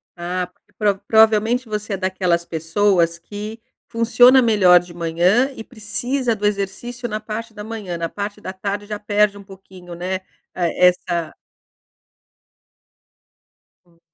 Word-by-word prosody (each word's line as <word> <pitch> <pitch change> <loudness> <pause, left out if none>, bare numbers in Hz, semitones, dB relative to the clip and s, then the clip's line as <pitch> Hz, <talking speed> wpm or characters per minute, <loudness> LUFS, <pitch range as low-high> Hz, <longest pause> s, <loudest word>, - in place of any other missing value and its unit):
Ah, 180 +1 -3
porque 180 - -35
pro 205 -4 +1
provavelmente 220 +2 +4
você 210 -1 -4
é - - -1
daquelas 185 -2 0
pessoas 170 +1 +1
que 210 +5 -8 0.3
funciona 245 +3 +5
melhor 200 -7 +6
de 175 0 -12
manhã 175 +10 +2
e 225 - -7
precisa 240 +3 -2
do 210 0 -4
exercício 210 +5 -3
na 215 0 -3
parte 220 +1 -6
da 210 - -8
manhã, 210 -5 -5
na 165 0 -3
parte 205 +2 -5
da 185 - -5
tarde 200 +2 -4
já 210 0 -5
perde 205 0 +1
um 200 - -11
pouquinho, 190 -2 -13
né, 180 +2 -3 0.4
eh, 180 0 +3
essa 170 -2 -3 2.5
Hum. 170 -1 -29
205 Hz, 140 wpm, -20 LUFS, 180-220 Hz, 2.5 s, melhor